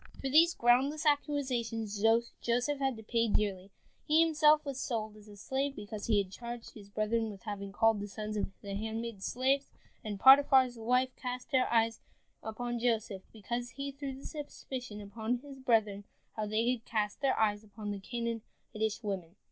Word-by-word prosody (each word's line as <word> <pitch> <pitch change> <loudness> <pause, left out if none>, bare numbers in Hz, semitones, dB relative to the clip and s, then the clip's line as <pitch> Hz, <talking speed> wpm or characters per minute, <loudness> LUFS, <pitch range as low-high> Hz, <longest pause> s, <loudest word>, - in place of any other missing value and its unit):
For 270 - -2
these 330 +5 +6
groundless 270 +6 +3
accusations 245 -8 0 0.4
Joseph 245 +5 0
had 270 -3 0
to 220 - -10
pay 230 +1 +1
dearly. 200 -3 0 0.4
He 300 - +2
was - - 0
himself 300 0 +7
sold 220 -5 -3
as 210 0 -15
a 205 - -12
slave, 270 +6 -2
because 205 0 -6
he 220 -3 +3
had 195 -2 0
charged 235 +2 -7
his 205 -2 -13
brethren 215 +2 0
with 200 -2 -10
having 200 -3 -5
called 225 +1 +3
the 205 - -4
sons 215 +1 -5
of 205 - 0 0.2
the 200 -1 -5
handmaids 220 0 -4
slaves, 270 +3 +1 0.3
and 210 -3 -4
Potiphar's 265 -2 +7
wife 250 +3 +1
cast 250 +1 -5
her 260 -2 +2
eyes 225 -1 +2 0.4
upon 240 +2 -4
Joseph, 220 -5 0
because 240 +3 -4
he 280 0 -3
threw 275 -1 -6
the 270 - -12
suspicion 260 -7 -6
upon 220 +4 -2
his 275 -2 -10
brethren 215 -6 +1 0.3
that 215 -1 -3
they 220 +2 +1
had 245 -3 -3
cast 210 0 -2
their 275 -2 +2
eyes 210 -1 +2
upon 210 0 -7
the 200 - -4
Canaanitish 225 -1 -4
women. 190 -4 -4
230 Hz, 175 wpm, -32 LUFS, 210-260 Hz, 0.4 s, himself